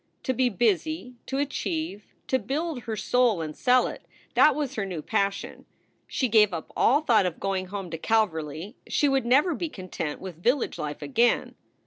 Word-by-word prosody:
To 260 - 0
be 255 0 +2
busy, 240 - 0
to 270 - -2
achieve, 290 - -2 0.2
to 260 - +1
build 275 +3 -3
her 225 - -3
soul 230 -1 +2
and 155 -1 -6
sell 250 0 +4
it - - -6 0.3
that 305 - +6
was 285 -3 -2
her 215 - -2
new 180 -5 -5
passion. 200 -1 -2 0.4
She 260 - 0
gave 210 -4 +4
up 160 - -7
all 280 +5 +4
thought 225 -10 +3
of 175 - -5
going 190 -1 -2
home 190 -2 -6
to 165 - -5
Calverly. 170 - -1
She 290 - +2
would 270 -3 +1
never 290 +8 +4
be 335 +2 -3
content 180 - -5
with 180 -3 -9
village 245 +6 +1
life 150 -1 -4
again. 240 -2 +2
225 Hz, 180 wpm, -26 LUFS, 185-265 Hz, 0.4 s, that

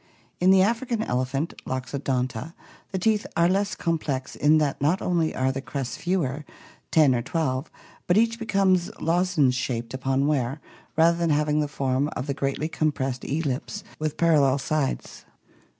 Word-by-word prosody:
In 180 - +4
the 190 0 +6
African 230 +1 0
elephant, 130 - -1
Loxodonta, 130 +1 -3 0.4
the 190 - -2
teeth 210 +3 +1
are 170 0 +5
less 200 +3 +1
complex 150 -6 -2
in 150 +2 +4
that 145 -3 0
not 160 +7 +2
only 170 -3 0
are 130 +1 +1
the 135 +1 -4
crests 135 -2 -4
fewer, 155 -5 -1 0.5
ten 150 -5 +5
or 120 - 0
twelve, 135 0 -2 0.4
but 175 - +3
each 230 +1 +2
be 225 - -6
comes 190 -4 +2
lozenge 165 -5 +2
shaped 125 -2 -3
upon 135 +1 0
wear 140 -1 0 0.4
rather 170 +1 +4
than 170 -1 +1
having 150 0 +2
the 150 - +1
form 135 -1 0
of 130 - -4
a - - +1
greatly 140 +3 -2
compressed 140 -5 -1
ellipse 150 +7 -3 0.2
with 155 -1 -2
parallel 145 -5 +4
sides. 140 0 -2
150 Hz, 160 wpm, -25 LUFS, 135-175 Hz, 0.5 s, the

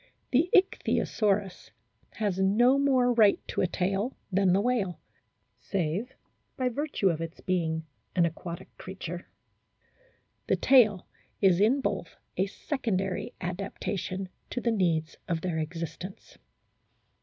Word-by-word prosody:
The 300 +8 +3
Ichthyosaurus 205 - +1 0.4
has 205 -4 -1
no 240 +8 +4
more 260 -3 +3
right 215 -4 +5
to - - -1
a - - +3
tail 195 +7 -1
than 190 0 +3
the 190 - +4
whale, 205 -6 0 0.6
save 195 +7 -2 0.4
by 255 -2 +1
virtue 275 -6 0
of 165 -2 -1
its 165 0 -6
being 160 -3 -1 0.3
an 175 - +4
aquatic 170 +1 -6
creature; 180 -2 -7 1.2
the - - +3
tail 215 -8 +5 0.3
is 190 -3 +4
in 250 +7 +4
both 200 -7 -3 0.2
a 190 +2 +1
secondary 195 -5 -2
adaptation 185 +1 -3 0.2
to - - -2
the 235 -1 +1
needs 170 -7 0
of 165 -2 -1
their 170 -3 -1
existence. 165 +3 -6
195 Hz, 120 wpm, -28 LUFS, 175-230 Hz, 1.2 s, right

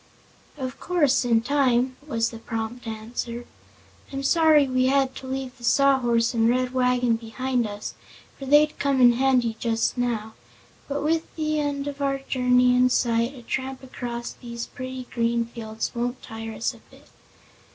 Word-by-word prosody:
"Of 260 -2 -5
course, 305 -8 +2
in 230 -2 +3
time," 255 -1 +2
was 230 -5 0
the 230 - -9
prompt 225 +1 -5
answer. 230 +2 -5 0.7
"I'm 275 0 -4
sorry 310 -1 +5
we 255 0 +2
had 270 -1 +2
to 260 - -8
leave 265 -1 -4
the - - -15
Sawhorse 240 -3 +3
and 225 -1 +3
the - - +4
Red 255 0 -1
Wagon 250 -2 +2
behind 240 +1 -2
us, 205 0 -6 0.5
for 270 - -7
they'd 295 +2 +4
come 280 -1 +1
in 245 -1 +7
handy 245 -3 +2
just 230 +1 0
now; 220 -3 -1 0.5
but 285 0 -2
with 320 +2 -1
the 310 -1 0
end 285 -1 -2
of 285 0 -5
our 275 -1 +1
journey 250 -2 +3
in 250 0 +4
sight 235 +1 +1
a 245 - -12
tramp 265 +2 -4
across 240 -2 -5
these 235 -1 -7
pretty 255 0 -7
green 235 0 +1
fields 225 -1 -5
won't 245 +1 -3
tire 225 0 -7
us 215 - -1
a - - -16
bit." - - -19
250 Hz, 170 wpm, -25 LUFS, 235-270 Hz, 0.7 s, in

